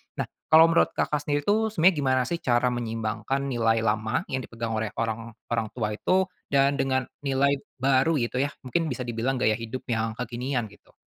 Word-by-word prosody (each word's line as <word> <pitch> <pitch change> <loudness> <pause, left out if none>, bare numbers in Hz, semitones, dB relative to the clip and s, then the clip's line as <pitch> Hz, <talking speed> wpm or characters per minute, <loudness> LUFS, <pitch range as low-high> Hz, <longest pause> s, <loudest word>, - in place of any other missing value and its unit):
Nah - - -1 0.2
kalau 160 +1 +7
menurut 165 - +3
Kakak 150 - 0
sendiri 145 0 0
itu 220 +6 +2
sebenarnya 185 -4 +4
gimana 130 -2 +2
sih 170 - -2
cara 125 -2 +2
menyeimbangkan 115 +2 -2
nilai 115 -4 +1
lama 110 +5 0
yang 130 - 0
dipegang 115 -2 -5
oleh 110 0 -1
orang 115 0 -3 0.2
orang 115 -2 0
tua 110 -4 -1
itu 185 - +1 0.2
dan 140 0 +2
dengan 130 -1 +1 0.2
nilai 140 0 +1 0.2
baru 135 +4 +2
gitu 120 +2 -2
ya 140 +1 -1
mungkin 160 +6 -1
bisa 125 -3 -3
dibilang 120 +2 -1
gaya 125 -3 +2
hidup 115 +3 -6
yang 110 -1 -1
kekinian 125 +2 -2
gitu. 105 - -21
130 Hz, 185 wpm, -26 LUFS, 115-140 Hz, 0.2 s, kalau